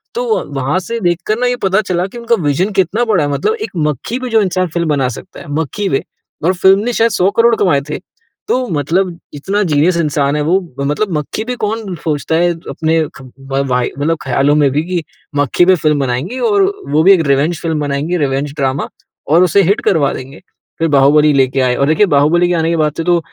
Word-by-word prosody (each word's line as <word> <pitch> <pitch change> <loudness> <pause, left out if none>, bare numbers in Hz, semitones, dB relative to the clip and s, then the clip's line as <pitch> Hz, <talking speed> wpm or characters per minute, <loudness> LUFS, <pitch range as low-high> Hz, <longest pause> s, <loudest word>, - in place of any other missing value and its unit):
तो 475 -2 0
वहाँ 135 +5 -1
से 230 +5 -5
देख 175 -3 +1
कर 215 +1 +1
ना 250 - +1
ये 245 - +1
पता 195 +2 +2
चला 180 -2 -1
कि 240 - -11
उनका 235 0 +1
विजन 160 +8 0
कितना 210 +6 +1
बड़ा 200 -9 +2
है। 145 - -1
मतलब 430 - 0
एक - - -4 0.2
मक्खी 150 - -3
पे 255 -1 -5
जो 225 -1 +3
इंसान 185 -1 0
फ़िल्म 170 -2 -1
बना 140 -3 +1
सकता 115 - -10
है। - - -11
मक्खी 195 +6 -3
पे 135 - 0 0.4
और 185 - +3
फ़िल्म 190 +2 +4
ने 245 +1 -1
शायद 225 0 +2
100 190 0 +2
करोड़ 230 0 +5
कमाए 170 -10 +2
थे। 150 - -3 0.5
तो 255 -1 0
मतलब 170 +4 -1 0.2
इतना 195 +8 -2
जीनियस 170 +1 +2
इंसान 145 -3 0
है 150 - 0
वो, 175 +6 +2 0.2
मतलब 150 +8 -1
मक्खी 150 +8 -4
पे 250 +1 -3
कौन 210 -3 -3
सोचता 155 +1 -1
है 175 +1 +2 0.2
अपने 160 0 0 0.2
ख, - - -12 0.2
व 135 0 -2
वाई 125 -1 0
मतलब 160 +2 0
ख्यालों 135 +3 +2
में 145 -2 +3
भी 150 +3 0
की 175 -1 -3 0.3
मक्खी 145 +5 +2
पे 185 +1 +5
फ़िल्म 150 -3 +1
बनाएँगे। 135 - -2
और 410 -3 +2 0.3
वो 155 +2 +3
भी 195 - +6
एक 180 - +3
रिवेंज 145 +5 +1
फ़िल्म 160 -2 -1
बनाएँगे। 145 +4 -1
रिवेंज 140 -1 -1
ड्रामा 135 -1 -1 0.4
और 170 +4 +5
उसे 190 +3 +3
हिट 195 +4 +1
करवा 150 -7 +2
देंगे। 135 +4 -9 0.4
फिर 165 - +1
बाहुबली 145 +2 +4
लेके 135 -1 +2
आए 125 -1 +1
और 140 +2 +1
देखिए 160 +7 +3
बाहुबली 155 +4 +3
के 180 - 0
आने 165 0 0
के 170 - +1
बाद 150 -1 +1
से 165 - -2
तो 175 0 +2
165 Hz, 225 wpm, -15 LUFS, 145-195 Hz, 0.5 s, भी